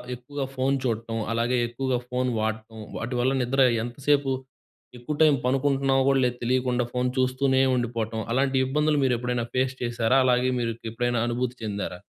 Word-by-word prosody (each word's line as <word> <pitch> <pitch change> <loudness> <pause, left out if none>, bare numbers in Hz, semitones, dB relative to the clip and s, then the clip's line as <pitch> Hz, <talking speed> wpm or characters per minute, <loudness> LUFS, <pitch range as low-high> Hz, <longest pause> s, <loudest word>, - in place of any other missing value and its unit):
ఎక్కువగా 135 +3 -5
ఫోన్ 135 +1 +1
చూడటం, 115 -1 -2 0.2
అలాగే 120 +2 +1
ఎక్కువగా 125 +1 -1
ఫోన్ 125 0 0
వాడటం 110 +1 -3 0.2
వాటి 120 +3 -3
వల్ల 130 +2 +2
నిద్ర 135 +2 +1 0.2
ఎంతసేపు 140 +3 0 0.7
ఎక్కువ 120 +5 -4
టైం 155 -2 +7
పనుకుంటున్నామో 135 0 +2
కూడా 130 -2 +3
తెలియకుండా 125 0 +1
ఫోన్ 125 0 0
చూస్తూనే 130 +1 +2
ఉండిపోవటం, 115 -2 -2
అలాంటి 135 +1 +1
ఇబ్బందులు 150 +2 +1
మీరు 130 -2 +3
ఎప్పుడైనా 125 -1 -1
ఫేస్ 130 0 +1
చేశారా? 120 0 +1
అలాగే 125 0 +3
మీరు 115 -1 -1 0.2
ఎప్పుడైనా 120 +1 0
అనుభూతి 125 +1 -2
చెందారా? 100 -4 -4
125 Hz, 150 wpm, -25 LUFS, 120-135 Hz, 0.7 s, టైం